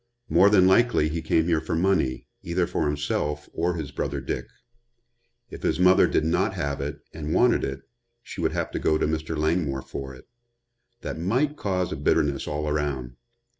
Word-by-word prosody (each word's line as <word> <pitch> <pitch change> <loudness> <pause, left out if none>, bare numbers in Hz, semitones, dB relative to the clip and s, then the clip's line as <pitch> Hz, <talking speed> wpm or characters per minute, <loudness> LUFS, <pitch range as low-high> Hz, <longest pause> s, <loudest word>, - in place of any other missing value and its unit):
"More 100 - +6
than 100 -3 +5
likely 95 -4 +4
he 80 +1 -3
came 80 0 +2
here 80 -2 +1
for 80 - -3
money, 85 -7 +1 0.2
either 85 +1 0
for 75 - -1
himself 75 0 -2
or 85 +1 0
his 75 -4 -5
brother - - -3
Dick. - - -4 1.0
If - - -8
his - - 0
mother 90 +1 +6
did 80 - +1
not 80 - +1
have 70 -1 -2
it 70 +2 -5
and 75 -1 -3
wanted 125 -1 +4
it 70 0 -3 0.4
she 100 - -7
would 80 - 0
have - - -2
to - - -3
go 80 - +2
to - - 0
Mr. 80 +1 -2
Langmore 75 -4 0
for 65 -1 -7
it. 65 - -17 0.7
That - - -5
might 125 - +1
cause 90 - -1
a - - -2
bitterness 70 -2 +1
all 75 +1 -2
around. 70 -5 -2
80 Hz, 185 wpm, -25 LUFS, 75-90 Hz, 1.0 s, More